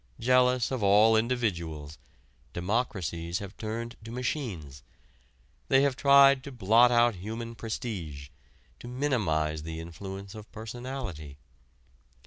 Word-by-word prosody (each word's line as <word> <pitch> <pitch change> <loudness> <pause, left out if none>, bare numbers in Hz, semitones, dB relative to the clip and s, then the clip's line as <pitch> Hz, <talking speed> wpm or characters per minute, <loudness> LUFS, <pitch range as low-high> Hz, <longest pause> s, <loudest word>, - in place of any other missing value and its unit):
Jealous 125 0 +3
of 130 -3 -2
all 105 +3 +5
individuals, 85 -11 -2 0.5
democracies 90 -4 -2
have 100 +1 -8
turned 115 +2 -5
to 110 - -9
machines. 115 - -4 0.9
They 135 +1 +4
have 140 -2 +1
tried 140 -1 +6
to 140 - -7
blot 120 +1 +4
out 120 0 +4
human 115 +5 -6
prestige, 95 - -6 0.5
to - - -10
minimize 100 - 0
the 80 +1 -6
influence 95 +4 -8
of 110 -1 -11
personality. 110 - -7
110 Hz, 115 wpm, -28 LUFS, 85-125 Hz, 0.9 s, tried